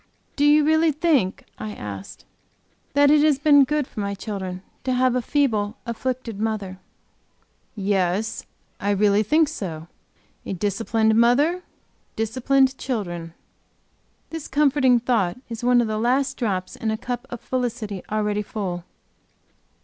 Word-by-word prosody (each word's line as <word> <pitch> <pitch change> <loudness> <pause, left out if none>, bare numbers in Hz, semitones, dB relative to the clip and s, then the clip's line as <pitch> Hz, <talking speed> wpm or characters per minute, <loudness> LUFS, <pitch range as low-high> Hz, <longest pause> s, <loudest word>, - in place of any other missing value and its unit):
"Do 290 - +2
you 300 +1 +6
really 315 +1 +4
think," 290 - +1
I 215 -1 -5
asked, 100 -2 -8 0.7
"that 285 0 +5
it 300 -1 +5
has 300 -2 +4
been 285 -1 +6
good 300 0 0
for 225 - -9
my 200 -1 -2
children 190 -3 -5 0.2
to 260 - 0
have 255 0 +3
a 250 - +1
feeble, 230 -5 0
afflicted 235 -2 -4
mother?" 205 -4 -3 1.0
"Yes, 200 0 -1 0.3
I 200 - -2
really 205 0 +3
think 305 +9 +3
so. 170 - -6 0.6
A - - -4
disciplined 220 +3 +1
mother 265 +10 +3 0.5
disciplined 260 +4 +1
children." 175 -9 -4 1.0
This 325 -2 -6
comforting 275 -3 +3
thought 230 -6 0
is 230 0 -6
one 245 0 +4
of 235 - -1
the 215 0 -2
last 265 +4 +1
drops 190 -7 -2
in 225 - -3
a 220 - -1
cup 245 +2 -5
of 245 - -6
felicity 235 -5 -3
already 210 -1 0
full. 190 -4 -4
230 Hz, 140 wpm, -23 LUFS, 205-270 Hz, 1.0 s, you